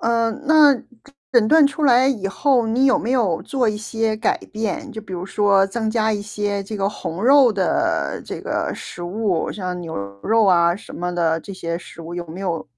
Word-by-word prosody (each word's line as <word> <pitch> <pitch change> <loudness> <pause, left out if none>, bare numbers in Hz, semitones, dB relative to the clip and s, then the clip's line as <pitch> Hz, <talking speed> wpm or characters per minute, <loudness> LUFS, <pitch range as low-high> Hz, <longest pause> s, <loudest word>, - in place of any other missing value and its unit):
嗯， 230 +2 0
那 305 -2 +7 0.6
诊 225 -3 +4
断 315 -2 +6
出 300 +2 -4
来 255 0 +5
以 215 -8 0
后 250 +2 +1
你 245 +4 +2
有 260 - +4
没 235 - -3
有 215 -11 +1
做 255 -4 0
一 210 - -1
些 220 0 -2
改 220 - 0
变， 260 +7 -3
就 220 -2 -7
比 190 - -11
如 180 +1 -5
说 200 -1 +3
增 220 +2 -2
加 220 -1 +1
一 205 - -3
些 205 -1 -3
这 210 +2 -6
个 195 0 0
红 180 -3 -6
肉 270 -3 +6
的 190 -2 -1
这 - - -6
个 - - -2
食 175 - -9
物， 185 -1 -1
像 180 -3 -5
牛 165 -2 -6 0.3
肉 225 0 +3
啊 170 -2 +4
什 225 - -13
么 180 0 -3
的 165 -2 0
这 195 - -9
些 170 -3 -4
食 170 - -12
物， 165 +1 -8
有 175 0 -4
没 165 +4 -8
有， 175 -4 -3
210 Hz, 225 characters per minute, -21 LUFS, 180-235 Hz, 0.6 s, 那